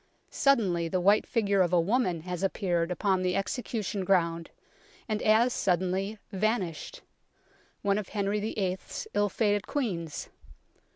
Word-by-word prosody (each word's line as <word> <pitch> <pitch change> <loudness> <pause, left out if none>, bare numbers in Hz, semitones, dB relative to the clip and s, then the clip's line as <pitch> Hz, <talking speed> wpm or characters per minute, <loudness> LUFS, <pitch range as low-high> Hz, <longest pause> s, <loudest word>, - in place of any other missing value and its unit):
Suddenly 195 - +2
the 185 +3 0
white 200 +4 +4
figure 200 -5 +2
of 175 -2 +2
a 180 - +4
woman 185 -2 +1
has 180 +1 -5
appeared 180 -3 0
upon 185 +1 +1
the 180 -1 0
execution 210 -1 -2
ground, 170 -3 +1 0.6
and 215 -2 -1
as 230 +3 +4
suddenly 190 +3 0
vanished 210 - -2 0.8
one 200 0 +2
of 205 - -7
Henry 205 0 -1
VIII. 195 -3 -2
's - - -6
ill 205 0 +2
fated 205 -2 0
Queens. 180 - -3
195 Hz, 135 wpm, -29 LUFS, 180-215 Hz, 0.8 s, white